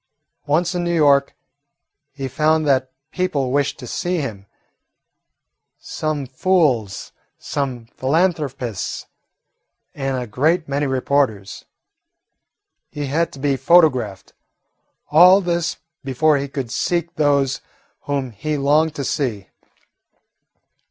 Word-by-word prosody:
Once 170 Hz, +5 st, +1 dB
in 175 Hz, -1 st, -2 dB
New 175 Hz, 0 st, 0 dB
York, 140 Hz, -3 st, +3 dB, 0.8 s
he 135 Hz, -1 st, -5 dB
found 155 Hz, +4 st, +1 dB
that 130 Hz, -2 st, +2 dB, 0.2 s
people 145 Hz, -8 st, -1 dB
wished 140 Hz, +1 st, 0 dB
to 125 Hz, -, -9 dB
see 175 Hz, +9 st, -2 dB
him, 105 Hz, -10 st, -5 dB, 1.3 s
some 155 Hz, -3 st, -3 dB
fools, 130 Hz, -, 0 dB, 0.3 s
some 130 Hz, -5 st, -4 dB
philanthropists, 135 Hz, -, -2 dB, 0.9 s
and 135 Hz, -2 st, -2 dB
a 125 Hz, -, -3 dB
great 155 Hz, +10 st, +1 dB
many 140 Hz, +1 st, -1 dB
reporters. 130 Hz, -6 st, -1 dB, 1.2 s
He 145 Hz, -1 st, -5 dB
had 160 Hz, +5 st, 0 dB
to -, -, -10 dB
be 140 Hz, 0 st, +1 dB
photographed 130 Hz, -, +2 dB, 0.8 s
all 180 Hz, +5 st, +8 dB
this 175 Hz, -2 st, -1 dB, 0.3 s
before 145 Hz, +3 st, +2 dB
he 140 Hz, 0 st, -3 dB
could 135 Hz, -4 st, -5 dB
seek 170 Hz, -1 st, -1 dB
those 140 Hz, -5 st, +1 dB, 0.4 s
whom 140 Hz, -3 st, -2 dB
he 150 Hz, +8 st, -3 dB
longed 150 Hz, +3 st, +2 dB
to 140 Hz, -, -3 dB
see. 115 Hz, -9 st, -2 dB
140 Hz, 110 wpm, -20 LUFS, 130-160 Hz, 1.3 s, all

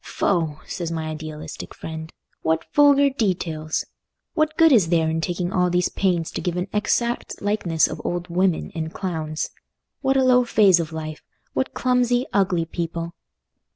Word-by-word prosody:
"Foh!" 165 Hz, -6 st, 0 dB
says 170 Hz, -2 st, -4 dB
my 160 Hz, -1 st, -3 dB
idealistic 155 Hz, -1 st, -7 dB
friend, 160 Hz, 0 st, -7 dB, 0.3 s
"what 160 Hz, 0 st, 0 dB
vulgar 285 Hz, -1 st, +6 dB
details! 170 Hz, -, -1 dB, 0.5 s
What 310 Hz, -1 st, 0 dB
good 325 Hz, -1 st, +6 dB
is 205 Hz, -11 st, +5 dB
there 165 Hz, -2 st, +3 dB
in 160 Hz, 0 st, 0 dB
taking 175 Hz, +2 st, -2 dB
all 180 Hz, -1 st, +3 dB
these 180 Hz, 0 st, +1 dB
pains 175 Hz, -4 st, 0 dB
to -, -, -4 dB
give 180 Hz, -1 st, -2 dB
an 180 Hz, +2 st, -1 dB
exact 235 Hz, +3 st, 0 dB
likeness 200 Hz, -6 st, +1 dB
of -, -, -6 dB
old 175 Hz, 0 st, -2 dB
women 180 Hz, 0 st, 0 dB
and 160 Hz, -2 st, -4 dB
clowns? 160 Hz, -5 st, -3 dB, 0.5 s
What 270 Hz, -1 st, +2 dB
a 265 Hz, -, +4 dB
low 250 Hz, -1 st, +5 dB
phase 205 Hz, -6 st, +5 dB
of 165 Hz, -1 st, -3 dB
life! 155 Hz, -1 st, -6 dB, 0.3 s
What 265 Hz, -, -2 dB
clumsy, 250 Hz, 0 st, +2 dB
ugly 185 Hz, -4 st, +2 dB
people!" 170 Hz, 0 st, -4 dB
175 Hz, 160 wpm, -23 LUFS, 160-215 Hz, 0.5 s, vulgar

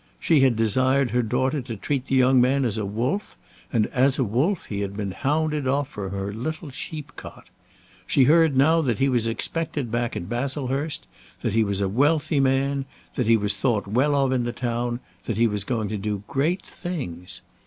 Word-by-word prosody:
She 160 Hz, -3 st, +3 dB
had 130 Hz, -3 st, +4 dB
desired 130 Hz, +4 st, +2 dB
her 125 Hz, +2 st, +2 dB
daughter 130 Hz, +5 st, 0 dB
to 120 Hz, -2 st, -6 dB
treat 135 Hz, +5 st, -2 dB
the 135 Hz, -, +1 dB
young 130 Hz, 0 st, +5 dB
man 135 Hz, +2 st, +2 dB
as 110 Hz, -2 st, -1 dB
a 105 Hz, -, -2 dB
wolf, 120 Hz, -, -2 dB, 0.3 s
and 110 Hz, -2 st, +2 dB
as 130 Hz, +2 st, +3 dB
a 135 Hz, -, +2 dB
wolf 135 Hz, -, 0 dB
he 100 Hz, -, -4 dB
had 100 Hz, 0 st, -4 dB
been 100 Hz, -2 st, -3 dB
hounded 150 Hz, +4 st, 0 dB
off 140 Hz, +1 st, 0 dB
from 100 Hz, -8 st, -5 dB
her 100 Hz, +1 st, -4 dB
little 155 Hz, -, -5 dB
sheep 150 Hz, +3 st, -6 dB
cot. -, -, -11 dB, 0.6 s
She 135 Hz, -, +4 dB
heard 155 Hz, 0 st, +4 dB
now 160 Hz, +5 st, +5 dB
that 120 Hz, -8 st, 0 dB
he 135 Hz, -, +2 dB
was 120 Hz, -4 st, +1 dB
expected 145 Hz, +1 st, -2 dB
back 120 Hz, 0 st, -1 dB
at 85 Hz, -, -4 dB
Baslehurst; 135 Hz, +4 st, -2 dB, 0.4 s
that -, -, -1 dB
he 115 Hz, 0 st, +4 dB
was 100 Hz, -1 st, -1 dB
a 100 Hz, -, +2 dB
wealthy 145 Hz, -, +2 dB
man; 135 Hz, +1 st, +1 dB, 0.3 s
that 125 Hz, -, -1 dB
he 115 Hz, 0 st, +6 dB
was 105 Hz, -1 st, +1 dB
thought 105 Hz, +1 st, 0 dB
well 130 Hz, +8 st, +2 dB
of 135 Hz, -2 st, +2 dB
in 130 Hz, -2 st, +1 dB
the 120 Hz, -, -2 dB
town; 120 Hz, 0 st, -2 dB, 0.2 s
that 115 Hz, -, -2 dB
he 115 Hz, -, +4 dB
was 105 Hz, -3 st, -1 dB
going 110 Hz, -1 st, -2 dB
to 110 Hz, -, -2 dB
do 100 Hz, 0 st, -3 dB
great 160 Hz, +8 st, 0 dB
things. 90 Hz, -, -5 dB
125 Hz, 205 wpm, -24 LUFS, 110-140 Hz, 0.6 s, he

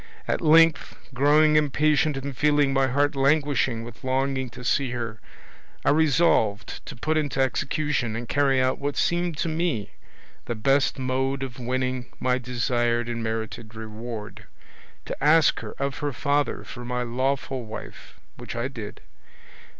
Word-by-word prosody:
At -, -, 0 dB
length 165 Hz, 0 st, +4 dB, 0.2 s
growing 150 Hz, +4 st, +4 dB
impatient 150 Hz, 0 st, +2 dB
and 135 Hz, 0 st, -5 dB
feeling 145 Hz, 0 st, +3 dB
my 135 Hz, 0 st, +3 dB
heart 145 Hz, +3 st, +1 dB
languishing 135 Hz, -4 st, +2 dB
with 115 Hz, -1 st, -11 dB
longing 130 Hz, 0 st, 0 dB
to 125 Hz, +1 st, -11 dB
see 135 Hz, +1 st, +1 dB
her, 115 Hz, -2 st, -4 dB, 0.7 s
I -, -, +5 dB
resolved 145 Hz, -, +2 dB
to -, -, -7 dB
put 155 Hz, +6 st, -1 dB
into 145 Hz, -3 st, -1 dB
execution 135 Hz, -2 st, 0 dB
and 120 Hz, +1 st, -5 dB
carry 140 Hz, -1 st, +2 dB
out 130 Hz, 0 st, +1 dB
what 145 Hz, 0 st, -3 dB
seemed 175 Hz, -2 st, 0 dB
to 170 Hz, -, -1 dB
me 160 Hz, -, -1 dB, 0.5 s
the 120 Hz, -, -3 dB
best 135 Hz, +7 st, +2 dB
mode 135 Hz, +1 st, -1 dB
of 130 Hz, -1 st, -7 dB
winning 125 Hz, 0 st, -2 dB
my 125 Hz, 0 st, +1 dB
desired 120 Hz, -1 st, 0 dB
and 115 Hz, -1 st, -3 dB
merited 110 Hz, 0 st, -4 dB
reward, 110 Hz, 0 st, -7 dB, 0.6 s
to -, -, -6 dB
ask 155 Hz, +1 st, +5 dB
her 110 Hz, -2 st, -7 dB
of 140 Hz, 0 st, -2 dB
her 145 Hz, -1 st, -2 dB
father 145 Hz, +3 st, 0 dB
for 120 Hz, -, -9 dB
my 125 Hz, 0 st, -2 dB
lawful 130 Hz, +1 st, -1 dB
wife, 110 Hz, -1 st, -10 dB, 0.2 s
which -, -, -7 dB
I 120 Hz, +3 st, -2 dB
did. 115 Hz, -6 st, -8 dB
130 Hz, 150 wpm, -25 LUFS, 120-145 Hz, 0.7 s, I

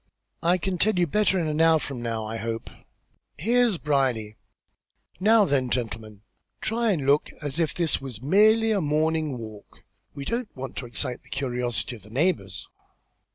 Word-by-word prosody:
"I 175 Hz, +2 st, +3 dB
can 185 Hz, 0 st, -3 dB
tell 215 Hz, 0 st, +2 dB
you 175 Hz, -, +4 dB
better 195 Hz, +3 st, +2 dB
in 170 Hz, -, 0 dB
an 155 Hz, 0 st, 0 dB
hour 165 Hz, 0 st, +6 dB
from 135 Hz, -5 st, -5 dB
now, 115 Hz, -2 st, -2 dB
I 110 Hz, +1 st, -4 dB
hope. 115 Hz, 0 st, -4 dB, 0.7 s
Here's 235 Hz, +3 st, +2 dB
Brierly. 130 Hz, -8 st, 0 dB, 0.8 s
Now 215 Hz, +2 st, +5 dB
then, 135 Hz, -6 st, +1 dB
gentlemen, 110 Hz, -4 st, -4 dB, 0.4 s
try 230 Hz, +1 st, 0 dB
and 155 Hz, -8 st, -1 dB
look 145 Hz, +2 st, +3 dB
as 145 Hz, +2 st, -2 dB
if 165 Hz, -2 st, 0 dB
this 170 Hz, -5 st, +1 dB
was 130 Hz, -6 st, -7 dB
merely 215 Hz, -, +4 dB
a 205 Hz, -3 st, +2 dB
morning 155 Hz, -2 st, 0 dB
walk. 110 Hz, -3 st, -11 dB, 0.3 s
We 140 Hz, -1 st, -6 dB
don't 235 Hz, -, -2 dB
want 135 Hz, 0 st, -6 dB
to 125 Hz, -, -4 dB
excite 125 Hz, +2 st, -3 dB
the -, -, -19 dB
curiosity 125 Hz, -2 st, -2 dB
of -, -, -19 dB
the 105 Hz, -, -16 dB
neighbours." 115 Hz, -, -1 dB
145 Hz, 170 wpm, -25 LUFS, 120-185 Hz, 0.8 s, hour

